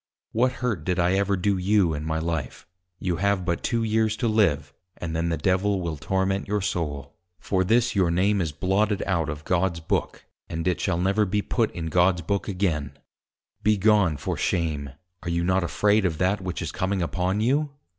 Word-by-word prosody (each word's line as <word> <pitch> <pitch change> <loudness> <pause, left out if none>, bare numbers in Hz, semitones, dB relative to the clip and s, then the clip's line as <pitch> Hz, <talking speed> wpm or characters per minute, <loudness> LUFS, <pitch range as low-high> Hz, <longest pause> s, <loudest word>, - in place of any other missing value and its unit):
What 125 +3 +2
hurt 110 -11 -1
did 90 +2 -1
I 90 0 +2
ever 100 0 +1
do 100 +2 +1
you 95 -3 +3
in 75 0 -4
my 80 0 -1
life? 80 -4 -3 0.3
You 90 -3 -2
have 100 0 +1
but 85 -1 -1
two 115 -1 0
Years 110 0 +1
to 120 - 0
live, 80 -10 +1 0.2
and 80 -2 -4
then 85 +1 0
the 80 - 0
Devil 95 +5 +1
will 85 -3 -3
torment 95 +6 -1
your 105 +1 0
Soul; 75 -7 -3 0.2
for 95 +3 0
this 120 +4 +2
your 95 -4 +3
Name 95 +4 +2
is 80 -3 -1
blotted 95 +6 0
out 85 -5 0
of 75 0 -6
God's 90 -1 +1
Book, 80 - -2 0.2
and 80 +2 -3
it 90 - 0
shall 85 - 0
never 95 +4 +2
be 105 +1 0
put 115 -3 0
in 85 - -4
God's 90 +2 +2
Book 100 +4 -1
again; 80 -8 -1 0.6
be 105 0 +3
gone 100 -6 +3
for - - -3
shame, 80 -5 -1 0.3
are - - -5
you 85 0 0
not 95 +1 +2
afraid 105 +4 +2
of 85 -4 0
that 95 +3 +1
which 90 -3 -4
is 80 - -4
coming 95 -1 -1
upon 90 +3 -1
you? 140 +7 +1
95 Hz, 200 wpm, -25 LUFS, 85-100 Hz, 0.6 s, you